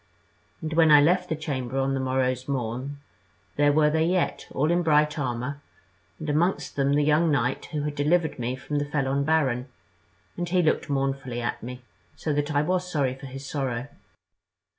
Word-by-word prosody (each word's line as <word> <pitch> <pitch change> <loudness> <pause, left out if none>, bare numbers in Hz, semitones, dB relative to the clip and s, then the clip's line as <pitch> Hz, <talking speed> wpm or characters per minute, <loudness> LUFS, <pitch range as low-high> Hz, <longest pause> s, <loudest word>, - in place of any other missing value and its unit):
And 160 0 -3
when 160 -1 +5
I 150 -1 +9
left 180 +5 +3
the 160 - 0
chamber 135 -5 -4
on 135 0 +1
the 135 - -1
morrow's 130 -1 0
morn, 130 +1 -3 0.6
there 145 0 +4
were 150 0 +4
they 160 +1 +2
yet, 175 +2 0
all 150 +4 0
in 175 +1 +3
bright 150 -2 +3
armour, 130 +2 -3 0.6
and 155 - -7
amongst 150 0 0
them 140 0 +2
the 145 +1 +3
young 155 +3 +3
knight 130 -3 0
who 150 -2 -4
had 150 0 -2
delivered 150 +1 +1
me 120 +1 -2
from 145 +3 -3
the 145 - -1
felon 140 -1 0
baron, 135 -5 +1 0.7
and 175 0 -2
he 180 0 +3
looked 155 -1 +1
mournfully 135 -3 -1
at 120 - -3
me, 125 +1 -8 0.3
so 155 - -2
that 145 +1 0
I 145 - +3
was 180 +2 -1
sorry 140 -5 +1
for 135 +1 -10
his 135 +1 -8
sorrow. 135 -3 -3
145 Hz, 185 wpm, -26 LUFS, 130-155 Hz, 0.7 s, I